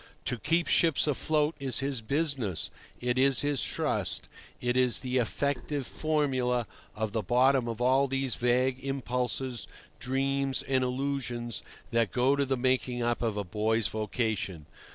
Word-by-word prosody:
To 125 -2 -2
keep 165 +7 +2
ships 165 -4 +3
afloat 150 +1 +1
is 135 -3 0
his 135 -3 -1
business; 135 - 0 0.3
it 125 +1 0
is 135 -1 +5
his 145 -2 +1
trust; - - 0 0.3
it 120 0 0
is 125 -1 +3
the 130 0 -1
effective 140 +3 -1
formula 130 -6 0 0.3
of 110 -1 -2
the 110 0 -1
bottom 125 +2 +3
of 115 -1 -4
all 130 +3 +3
these 135 -2 0
vague 125 +2 +1
impulses, 125 -2 -2 0.3
dreams, 135 +1 0
and 130 -1 +1
illusions 125 -3 -2 0.3
that 115 -4 +2
go 130 +6 +3
to 140 0 +1
the 135 0 0
making 125 -1 0
up 120 0 0
of 110 -3 -1
a 105 - -1
boy's 110 +3 0
vocation. 110 - -2
125 Hz, 150 wpm, -29 LUFS, 120-135 Hz, 0.3 s, is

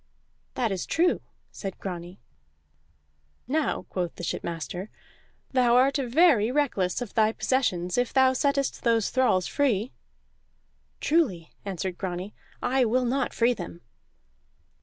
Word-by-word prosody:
"That 235 -4 0
is 190 -2 -3
true," 345 +2 +2 0.3
said 195 -2 -6
Grani. 180 0 -7 1.3
"Now," 300 +3 0
quoth 175 -2 -3
the - - -8
shipmaster, 170 +4 -4 0.6
"thou 245 -2 +4
art 270 +3 +4
very 255 -3 +4
reckless 245 -7 0
of 235 - -11
thy 220 -1 +3
possessions 185 -9 0
if 245 - 0
thou 265 -1 +4
settest 280 0 0
those 230 -3 +2
thralls 250 -9 +2
free." 250 -5 0 1.1
"Truly," 250 - +1
answered 190 -2 -4
Grani, 185 +2 -4 0.3
"I 260 +1 +2
will 250 +2 +2
not 265 +2 0
free 240 +1 +2
them." 175 -4 -8
235 Hz, 120 wpm, -27 LUFS, 185-265 Hz, 1.3 s, thou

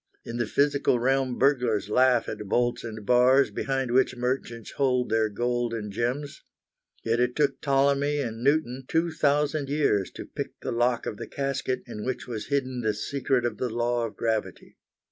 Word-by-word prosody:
In 115 - -5
the 120 -2 -1
physical 140 0 +2
realm 130 0 +1
burglars 125 -7 +2
laugh 125 +1 +3
at 105 - -5
bolts 120 +3 +1
and 110 -2 -7
bars 125 +4 +4
behind 135 -2 -2
which 130 +1 +3
merchants 125 -2 -3
hide 125 -3 +1
their 110 0 +2
gold 120 +2 -1
and 105 -2 -5
gems. 125 +7 -3 0.6
Yet 115 +1 +1
it 125 0 +1
took 145 -2 +1
Ptolemy 140 +1 +2
and 115 -4 -3
Newton 135 -3 +1
2,000 150 -3 +1
years 140 -10 +1
to - - -7
pick - - -7
the - - -3
lock 120 0 +1
of 105 - -4
the - - -7
casket 135 -2 -2
in 105 -3 -7
which 130 0 -3
was 115 -3 -5
hidden 130 -3 -1
the 110 -2 0
secret 130 0 -1
of 115 -3 -2
the 125 - -1
law 120 +1 0
of 110 - -12
gravity. 110 -2 -3
125 Hz, 175 wpm, -26 LUFS, 115-140 Hz, 0.6 s, bars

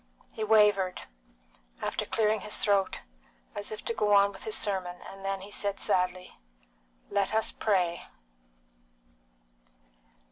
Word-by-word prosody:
He 220 - -3
wavered, 210 -4 +4 0.8
after - - -2
clearing 215 -1 +1
his 210 - 0
throat, 200 -2 +1 0.5
as 205 - -4
if 215 - -7
to - - +1
go 210 -2 +2
on 200 0 +5
with 195 - -11
his 435 - -1
sermon, 185 -3 -2
and 195 0 -11
then 195 0 -2
he 200 +2 -10
said 200 -1 -2
sadly, 180 0 0 0.7
"Let 200 +1 +1
us 220 - +2
pray!" 180 -5 0
200 Hz, 130 wpm, -29 LUFS, 190-210 Hz, 0.8 s, on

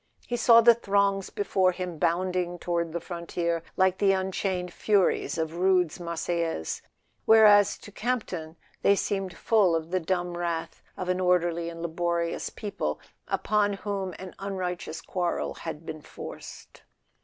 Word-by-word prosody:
He 240 - -2
saw 230 -1 +7
the 235 +1 +8
throngs 200 -3 +1
before 190 -2 +1
him 180 -3 -5
bounding 175 +1 0
toward 170 -1 -2
the 170 - -2
frontier 170 -1 -3 0.2
like 190 0 +3
the 195 -1 +4
unchained 190 -1 -2
furies 200 -5 +1
of 160 +1 -2
Rude's 180 -2 +2
"Marseillaise"; 170 - -2 0.5
where¬ 220 -1 +8
as 205 -1 +5
to 205 - -13
Campton 190 -9 -3 0.3
they 200 - +5
seemed 195 -2 -2
full 205 -7 +3
of 165 +1 -3
the 185 - +2
dumb 175 +1 -2
wrath 170 -1 -3 0.2
of 185 - -4
an 180 0 0
orderly 175 -2 +1
and 165 0 -8
laborious 170 0 -1
people 135 - -4 0.3
upon 205 -1 +1
whom 195 -3 -4
an 185 -1 -9
un¬ 195 0 -4
righteous 180 -3 -4
quarrel 175 -2 -2
has 165 - -5
been 155 0 -8
forced. - - -10
180 Hz, 150 wpm, -27 LUFS, 170-195 Hz, 0.5 s, the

